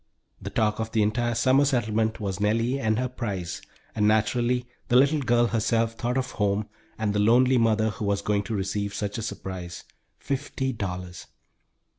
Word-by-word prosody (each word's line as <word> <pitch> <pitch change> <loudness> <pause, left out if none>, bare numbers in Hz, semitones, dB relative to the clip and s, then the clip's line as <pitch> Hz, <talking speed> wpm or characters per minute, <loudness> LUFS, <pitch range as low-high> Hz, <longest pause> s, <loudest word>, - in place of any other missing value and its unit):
The - - -5
talk 105 -1 0
of 110 0 -3
the 110 -2 +3
entire 120 +3 0
summer 130 +4 +4
settlement 110 -5 0
was 100 -3 -3
Nellie 115 +6 +1
and 110 -4 +1
her 125 +1 0
prize, 100 -9 -4 0.3
and 105 0 +2
naturally, 120 +3 +2 0.2
the 120 - +1
little 140 +4 +5
girl 120 -2 +3
herself 115 0 +1
thought 120 +2 -2
of 130 -1 -2
home 105 0 0 0.3
and 110 -2 -1
the 105 - 0
lonely 125 +4 +4
mother, 110 -1 +2
who 105 - -5
was 100 0 0
going 105 0 +1
to 115 - -3
receive 100 +1 -2
such 105 +2 -3
a - - -3
surprise 95 -5 -6 0.3
fifty 135 -1 -3
dollars! 90 -4 -5
110 Hz, 175 wpm, -26 LUFS, 105-120 Hz, 0.3 s, little